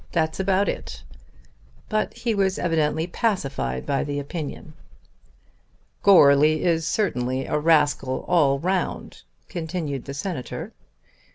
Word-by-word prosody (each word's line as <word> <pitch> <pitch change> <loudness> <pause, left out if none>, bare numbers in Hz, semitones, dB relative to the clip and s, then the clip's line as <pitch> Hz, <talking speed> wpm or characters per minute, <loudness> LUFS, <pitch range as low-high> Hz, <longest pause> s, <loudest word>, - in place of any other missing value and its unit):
That's 160 0 0
about 190 +1 +2
it." - - -5 0.8
But 215 - -1
he 230 -1 -1
was 195 -2 +1
evidently 160 -2 0
pacified 140 - -2
by 140 - 0
the 145 -1 -3
opinion. 150 +1 -6 1.3
"Goarly 155 -5 +6
is 165 -2 +1
certainly 130 - -1
a 150 - -1
rascal 150 -4 +2
all 150 -6 +3
round," 185 +5 -2 0.3
continued 160 -5 -4
the 140 - -6
Senator. 140 -4 -5
160 Hz, 110 wpm, -24 LUFS, 140-185 Hz, 1.3 s, Goarly